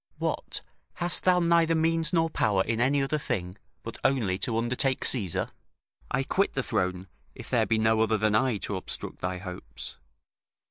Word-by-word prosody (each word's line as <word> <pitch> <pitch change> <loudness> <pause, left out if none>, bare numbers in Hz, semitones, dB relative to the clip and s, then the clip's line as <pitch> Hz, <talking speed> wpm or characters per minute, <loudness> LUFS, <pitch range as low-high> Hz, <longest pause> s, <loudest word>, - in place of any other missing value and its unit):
What, - - -2 0.3
hast 175 -1 -1
thou 180 -1 +5
neither 170 -1 +3
means 165 0 +2
nor 165 -2 +3
power 105 -11 +1
in 115 +2 -1
any 135 +2 +3
other 150 +3 -1
thing, 95 -10 -3 0.3
but 115 - -7
only 115 -9 +1
to 115 -2 -1
undertake 125 +3 +1
Caesar? 100 -10 +1 0.6
I 135 - 0
quit 195 +8 0
the 135 - 0
throne, 90 -2 -1 0.3
if - - -9
there - - +3
be 115 - +2
no 110 0 +3
other 110 0 +2
than 105 0 +1
I 120 +1 +2
to 100 - -2
obstruct 95 - -4
thy 90 0 -2
hopes. 90 -10 -7
115 Hz, 175 wpm, -28 LUFS, 100-150 Hz, 0.6 s, thou